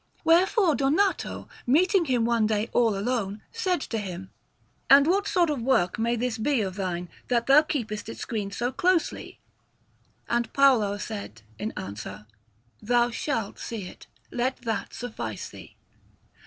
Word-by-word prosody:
Wherefore 355 +2 +4
Donato, 310 +9 0 0.2
meeting 350 +7 +4
him 250 -5 +1
one 230 -2 +2
day 215 +1 -1
all 225 -4 +3
alone, 210 -2 -2
said 375 -7 0
to 225 - -3
him: 190 -2 -7 0.6
"And 280 +1 +8
what 395 +5 +2
sort 345 -5 +2
of 280 -5 -2
work 230 -6 +1
may 235 +1 +1
this 235 -1 -2
be 265 +1 +1
of 190 -2 -2
thine, 180 -2 -3 0.2
that 235 -2 +1
thou 275 +3 +7
keepest 225 -9 -4
it - - -7
screened 205 -4 -4
so 245 +1 -1
closely?" 355 +4 0 0.9
And 235 -1 0
Paolo 245 -8 +4
said 200 - -7 0.2
in 215 +2 -3
answer: 100 +1 -7 0.6
"Thou 240 +2 +2
shalt 230 -4 -3
see 225 -4 -5
it. - - -12 0.2
Let 250 +1 -2
that 225 -2 -3
suffice 120 - -5
thee." - - -13
235 Hz, 150 wpm, -26 LUFS, 205-280 Hz, 0.9 s, And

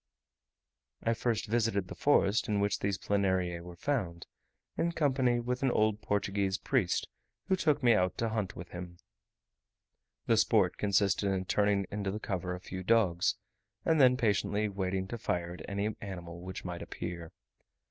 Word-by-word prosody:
I 115 - +2
first 115 -1 -1
visited 110 -4 0
the - - -7
forest 115 -5 +3
in 105 -2 +1
which 100 0 +1
these 100 -1 -1
Planariae 95 -4 0
were 85 0 -10
found, 90 -7 -2 0.5
in 170 0 0
company 130 -6 +2
with 125 +1 -2
an 135 - +3
old 110 -2 +2
Portuguese 100 -1 0
priest - - 0 0.4
who 190 - +4
took 150 -6 +1
me 120 -1 +6
out 90 -4 +1
to 115 - 0
hunt 110 -4 -2
with 85 - -8
him. 90 0 -8 1.3
The 115 - +3
sport 105 -5 +3
consisted 100 -1 +2
in 95 -1 -1
turning 100 +1 +2
into 100 -1 -2
the 105 +3 -3
cover 90 -3 -3
a - - -7
few 95 0 -6
dogs, 95 -4 +3 0.5
and 160 -2 +4
then 125 -1 +6
patiently 105 -2 +1
waiting 95 -1 -2
to 120 - -5
fire 85 -3 -2
at 90 - -9
any 100 +2 -1
animal 85 -3 -7
which 95 +1 -7
might 90 -1 -5
appear. 85 -2 -6
100 Hz, 165 wpm, -31 LUFS, 90-115 Hz, 1.3 s, me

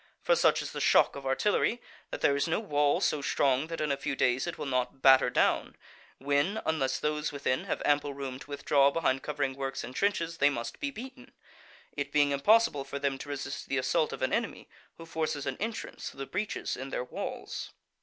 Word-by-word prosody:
For - - +4
such - - +3
is - - -6
the - - -5
shock - - +4
of 140 -1 -6
artillery 210 - +1 0.3
that - - -6
there 140 - +4
is 140 - 0
no 165 - +1
wall 145 -9 +1
so 150 - +1
strong 135 +1 +1
that 165 0 -5
in 150 -1 0
a 140 - 0
few 140 - -3
days 125 -1 +1
it - - -4
will - - -4
not 130 0 -2
batter 130 -2 +7
down, - - +1 0.4
when, 145 +10 +1
unless 135 -5 0
those 150 0 -1
within 140 -3 -1
have - - -3
ample 145 -1 +1
room 135 -2 -5
to 140 - -13
withdraw 140 0 +3
behind 140 -3 0
covering 145 -3 -2
works 135 0 -4
and 125 - -8
trenches, 170 -3 0
they 145 - +5
must 120 -4 -5
be 285 - -1
beaten; 260 0 -10 0.6
it 145 0 -3
being 145 -1 +3
impossible 175 +1 +3
for 135 +1 -6
them 140 -1 -1
to 145 - -8
resist 140 0 -5
the 135 - 0
assault 155 +4 +1
of - - -5
an 130 - 0
enemy - - -2 0.3
who 165 - -10
forces 155 -3 -2
an - - -2
entrance 225 +2 -4
through - - -16
the 135 - -4
breaches 205 +8 -3
in 135 +1 -6
their 125 - -2
walls. 125 - -6
140 Hz, 215 wpm, -30 LUFS, 135-160 Hz, 0.6 s, batter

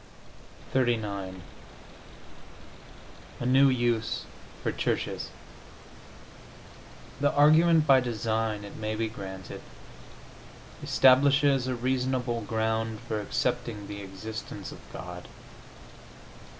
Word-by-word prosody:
XXXIX 105 -7 -1 2.0
A - - -3
NEW 135 +2 +6
USE 120 -3 0 0.4
FOR - - 0
CHURCHES - - -2 1.9
The 145 0 +3
argument 155 +2 +5
by 135 -3 +7
design, 110 -3 -1
it 100 - -9
may 110 0 -2
be 110 +1 -1
granted, 95 -4 -8 1.2
establishes 135 0 +4
a 130 - -1
reasonable 125 -1 -1
ground 110 0 -1
for 110 -1 -3
accepting 105 +1 -2
the 100 0 -6
existence 100 +1 -7
of - - -10
God. 90 -1 -8
115 Hz, 85 wpm, -28 LUFS, 105-130 Hz, 2.0 s, by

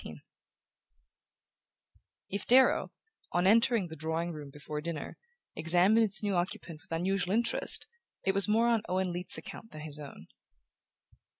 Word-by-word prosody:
XIV - - -10 2.1
If 200 0 -5
Darrow, 260 +2 +5 0.4
on 175 +1 +2
entering 230 0 +4
the 160 - -8
drawing 160 +3 -2
room 150 -2 -8
before 150 +1 -6
dinner, 165 -1 -5 0.4
examined 180 +7 +4
its 215 +1 -3
new 205 -1 0
occupant 175 -2 -3
with - - -24
unusual 185 +3 0
interest, 235 0 0 0.4
it 190 - +3
was 200 +1 +4
more 225 +3 +3
on 230 -2 +2
Owen 185 -1 0
Leath's 180 +1 -3
account 225 - -9
than 155 - -9
his 150 -1 -7
own. 140 - -10
180 Hz, 140 wpm, -30 LUFS, 160-210 Hz, 2.1 s, Darrow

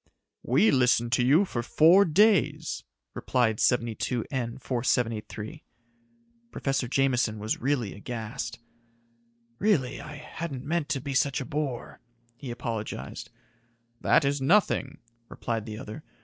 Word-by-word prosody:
"We 220 - +3
listened 125 -3 +3
to 125 - +3
you 150 +10 +5
for 120 -10 -3
four 170 +10 +5
days," 160 - +2 0.3
replied 115 -4 0
72N 120 +1 -1
4783. 120 +1 -2 0.9
Professor 135 - -1
Jameson 125 -4 +1
was 105 +1 -3
really 125 -5 0
aghast. 115 +3 -5 1.0
"Really, 185 -12 +1
I 150 - -9
hadn't 150 -2 -6
meant 160 0 -1
to 140 -3 -1
be 140 +1 -4
such 140 +2 +1
a 135 - -4
bore," 140 -3 -4 0.4
he 130 +1 -8
apologized. 115 -3 -5 0.7
"That 160 - +3
is 140 0 0
nothing," 185 +10 +2 0.3
replied 115 -1 -4
the 110 -1 -6
other. 125 +5 -8
130 Hz, 120 wpm, -27 LUFS, 120-150 Hz, 1.0 s, you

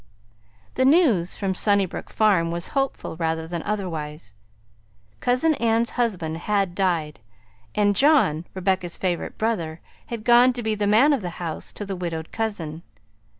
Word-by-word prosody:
The - - +1
news 260 - +3
from 195 -2 -1
Sunnybrook 200 -1 0
Farm 195 -6 +2
was 170 +1 -3
hopeful 270 - -2
rather 160 -1 -1
than 170 0 -4
otherwise. 160 - -4 0.9
Cousin 255 +6 +2
Ann's 230 -3 +1
husband 180 -10 -1
had 195 0 0
died, 170 -5 -1 0.6
and 205 -1 +3
John, 265 - +3
Rebecca's 185 -2 -1
favorite 180 -2 -2
brother, 170 -8 -2 0.3
had 230 -2 -5
gone 245 +2 +6
to 240 -1 -5
be 220 0 0
the 210 -1 -1
man 240 +9 +5
of 270 - 0
the 180 - -4
house 165 -3 -5
to 205 - -6
the 195 -1 -4
widowed 165 -3 -5
cousin. 170 -8 -3
195 Hz, 150 wpm, -24 LUFS, 170-230 Hz, 0.9 s, gone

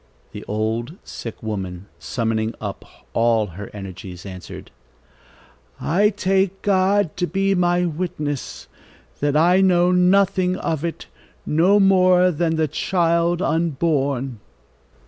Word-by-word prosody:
The - - -8
old, 110 - -2
sick 115 -1 -8
woman, 95 -4 -5
summoning 115 -2 -2
up 100 -3 -6 0.3
all 115 -1 +2
her 100 +1 -9
energies, 95 -2 -9
answered: 90 -2 -9 1.1
"I 200 +6 +2
take 195 -1 0
God 195 -2 +2
to 175 - 0
be 195 +1 +1
my 175 -1 +2
witness, 155 -4 -4 0.5
that 145 0 +1
I 175 +4 +4
know 180 -1 +4
nothing 185 0 +3
of 160 -4 -3
it, 170 -1 -4 0.4
no 180 +7 +3
more 185 -2 +5
than 165 0 0
the 160 -1 +1
child 170 +2 +1
unborn." 140 -6 0
165 Hz, 115 wpm, -21 LUFS, 115-185 Hz, 1.1 s, more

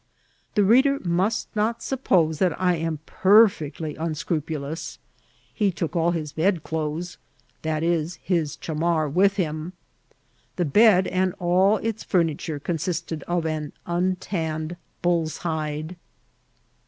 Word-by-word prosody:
The 205 - +4
reader 265 +7 +5
nrast 185 +2 0
not 220 +2 0
suppose 175 - +1
that 180 -4 +1
I 180 -1 +3
am 160 -2 -3
perfectly 185 -7 +3
unscrupnloas; 160 -1 -3 0.6
he 205 -3 +1
took 170 -2 -3
aU'his 165 -3 0
bedclothes, 160 -1 -1 0.4
viz., 160 +1 0
his 165 -6 0
ohalnar, 160 -2 -1
vrith 195 +3 +4
him* 160 -1 -2 0.8
The 175 - 0
bed 190 +4 +5
and 185 0 0
all 185 +4 +3
its 225 0 -3
ftimiture 160 -4 -1
consisted 165 -1 -2
of 175 -1 0
an 155 -2 -3
untanned 175 -2 -2 0.3
bull's 170 -3 +1
hide. 155 +1 -3
170 Hz, 110 wpm, -24 LUFS, 155-185 Hz, 0.8 s, reader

